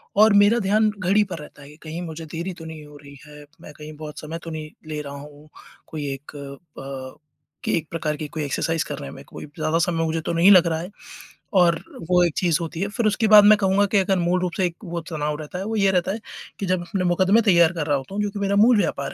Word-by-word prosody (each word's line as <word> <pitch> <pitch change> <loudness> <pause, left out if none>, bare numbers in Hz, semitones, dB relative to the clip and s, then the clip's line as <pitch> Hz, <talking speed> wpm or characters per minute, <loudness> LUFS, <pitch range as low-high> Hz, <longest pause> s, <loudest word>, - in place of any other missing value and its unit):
और 215 +1 +6
मेरा 225 +4 +3
ध्यान 215 +1 +3
घड़ी 195 +4 +3
पर 185 -4 -6
रहता 150 -1 -12
है 140 - -13
कि 150 - -15
कहीं 165 +3 -5
मुझे 160 +1 -8
देरी 175 +3 -4
तो - - -9
नहीं 160 -2 -9
हो 150 0 -14
रही 140 0 -13
है। 150 0 -13 0.2
मैं 150 - -12
कहीं 150 +1 -10
बहुत 150 -1 -8
समय 160 +2 -6
तो 165 - -7
नहीं 155 0 -7 0.2
ले 150 -1 -3
रहा 140 -1 -8
हूँ, 145 +1 -12 0.4
कोई 150 -2 -5
एक 135 +2 -10 0.5
प 135 -1 -8 0.4
कि - - 0
एक 155 -2 -4
प्रकार 155 -2 -2
की 155 - -5
कोई 150 +1 -5
एक्सरसाइज़ 160 +3 -1
करने 70 - -6
में, - - -11
कोई - - -10
ज़्यादा 155 +2 -2
समय 170 -1 0
मुझे 160 0 -2
तो - - -1
नहीं 170 +4 +6
लग 180 -3 +7
रहा 160 -1 -1
है 175 +3 -6 0.7
और 170 -1 +4 0.3
वो 180 -1 +4
एक 170 -3 +1
चीज़ 170 -4 +2
होती 165 0 -5
है। 200 - 0
फिर 220 +2 -2
उसके 215 +1 +1
बाद 210 -1 +10
मैं 215 +1 +7
कहूँगा 200 0 +2
कि - - +5
अगर 190 0 +1
मूल 175 +1 +1
रूप 180 -1 -1
से 190 - +2
एक 170 -1 -3
वो 170 -1 -4
तनाव 150 -2 -2
रहता 155 +4 -7
है, 190 - -4
वो 225 +1 -3
ये 195 -2 +3
रहता 185 0 +1
है, 220 - -5 0.4
कि 200 - -2
जब 185 -1 0
अपने 185 +2 -2
मुकदमे 185 +5 +3
तैयार 170 -6 +4
कर 165 -4 -3
रहा 145 - +2
होता 135 +9 -8
हूँ 210 - 0
जो 205 - -1
कि 205 - -6
मेरा 200 0 0
मूल 225 +3 +5
व्यापार 205 - -1
170 Hz, 265 wpm, -23 LUFS, 150-195 Hz, 0.7 s, बाद